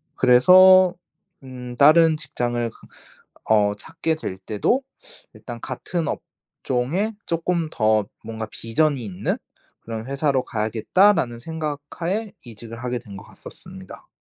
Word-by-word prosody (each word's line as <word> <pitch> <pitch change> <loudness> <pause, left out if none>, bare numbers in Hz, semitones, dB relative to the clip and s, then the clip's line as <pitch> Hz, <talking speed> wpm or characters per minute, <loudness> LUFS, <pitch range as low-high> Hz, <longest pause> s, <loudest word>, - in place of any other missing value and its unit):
그래서 185 +8 +7 0.5
음 125 -2 -8
다른 155 +3 +6
직장을 120 -5 -2
그 - - -18 0.6
어 105 -2 +4
찾게 165 - -3
될 155 -12 -6
때도 105 - 0 0.5
일단 - - -9
같은 170 -3 -4
업종에 155 - -3
쪼끔 170 0 -1
더 110 -2 +2 0.2
뭔가 110 -1 -6
'비전이 130 +4 -1
있는 95 -4 -2 0.4
그런 115 0 -6
회사로 140 -1 0
가야겠다.'라는 120 - +2
생각하에 160 - -4
이직을 115 0 -10
하게 125 -1 -2
된 105 -5 -11
것 100 - -10
갔었습니다. - - -10
130 Hz, 255 characters per minute, -22 LUFS, 115-165 Hz, 0.6 s, 그래서